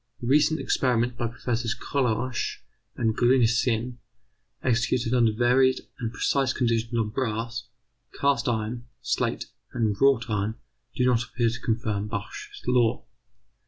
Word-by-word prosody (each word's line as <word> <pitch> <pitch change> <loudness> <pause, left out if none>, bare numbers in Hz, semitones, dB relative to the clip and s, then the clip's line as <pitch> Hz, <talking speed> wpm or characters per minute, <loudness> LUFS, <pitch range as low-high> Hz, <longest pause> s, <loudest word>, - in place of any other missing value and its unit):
Recent 150 +5 +3
experiments 120 -2 +1
by 120 -1 -1
Professors 115 0 -2
Kohlrausch 125 -2 -1 0.3
and 110 -3 0
Gruncisen, 120 -1 +2 0.7
executed 120 -1 +1
under 120 -3 +4
varied 125 +3 +3 0.2
and 115 -2 -3
precise 135 0 +1
conditions 115 -1 0
on 110 -2 0
brass, 115 0 -3 0.5
cast 140 -2 +2
iron, 115 +1 -2 0.2
slate, - - -1 0.3
and 110 -3 +1
wrought 135 -4 +4
iron, 105 0 -1 0.4
do 125 - +2
not 120 -2 +3
appear 120 -1 0
to 115 - -6
confirm 110 -3 -1
Bach's 410 - -6
law. 120 -2 +2
120 Hz, 125 wpm, -26 LUFS, 115-125 Hz, 0.7 s, under